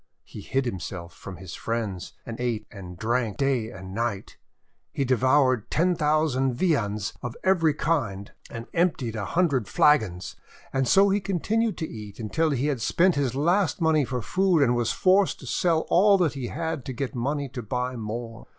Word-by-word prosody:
He - - -10
hid 135 0 -1
himself 90 -5 -5
from 95 - -9
his 95 -1 -9
friends, 110 -6 -4
and 115 -1 -7
ate 115 -3 -2
and 90 -5 -10
drank 115 0 -1
night 135 - +2 0.2
and 95 +1 -9
day. 115 -4 -1 0.7
He 140 - -1
devoured 130 -2 +2
ten 180 +3 +2
thou 155 -1 +2
sand 130 -3 0
viands 110 - 0
of 125 -2 -6
every 165 -6 +3
kind, 115 -13 -1 0.2
and 115 0 -7
emptied 155 -10 0
a 105 -2 -3
hundred 140 - +1
flagons. 110 -12 +2 0.4
And 135 -1 +1
so 195 +9 +5
he 200 +1 +1
continued 210 +4 0
to 160 - -3
eat 105 -3 -9
until 155 +9 0
he 140 -2 0
had 140 -5 -1
spent 180 +10 +3
his 135 -4 -1
last 180 +8 +1
money 160 -3 +3
for 125 -2 -3
food 185 -5 +2
and 125 -2 +2
was 120 -1 0
forced 190 +1 +3
to - - -10
sell 165 -3 +1
all 200 +3 +5
that 175 -6 +1
he 135 -3 -4
had 160 -2 -3
to 130 - -4
get 135 +3 -4
money 140 +3 -2
to 125 0 -6
buy 125 +3 -3
more. 115 +1 -6
130 Hz, 185 wpm, -25 LUFS, 115-160 Hz, 0.7 s, so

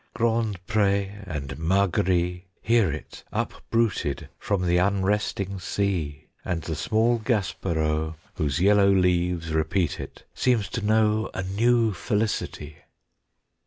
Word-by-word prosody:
Grand 110 -5 0
Pré 100 -1 0
and 70 -4 -5
Margaree 90 0 +1 0.2
Hear 115 -7 +3
it 75 - -8
upbruited 115 -11 -1
from 100 -3 -1
the 90 0 +3
unresting 100 0 0
sea; 85 -6 -2 0.2
And 85 -3 -2
the 80 - -3
small 110 +8 +2
Gaspareau, 80 -8 -1 0.2
Whose 70 -2 -1
yellow 100 +1 +5
leaves 90 -3 +1
repeat 80 +3 0
it, - - -9
seems 120 -5 +1
to 115 - -3
know 110 0 +2
A 95 - -2
new 115 +3 +2
felicity. 95 -6 -2
95 Hz, 115 wpm, -25 LUFS, 85-105 Hz, 0.2 s, yellow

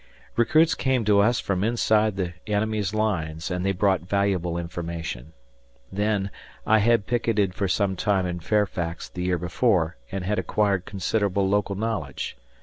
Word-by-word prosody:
Recruits 155 +8 +4
came 130 -4 0
to 105 -1 +4
us 110 +4 +3
from 95 -1 -1
inside 110 -2 +2
the 90 -3 -2
enemy's 105 -1 0
lines, 90 -7 -1
and 90 0 -2
they 95 - +2
brought 95 -1 +2
valuable 90 -2 0
information. 85 -4 -5 0.6
Then, 100 0 0 0.3
I 110 0 +5
had 115 0 +3
picketed 110 -5 +1
for 100 0 -1
some 95 +1 +1
time 95 -1 +1
in 90 -1 -3
Fairfax 90 -3 -1
theyear 90 -1 -1
before 90 - +1
and 95 -1 -3
had 105 +2 0
acquired 100 -3 +1
considerable 100 -1 0
local 100 0 +1
knowledge. 100 - -3
100 Hz, 145 wpm, -25 LUFS, 90-105 Hz, 0.6 s, I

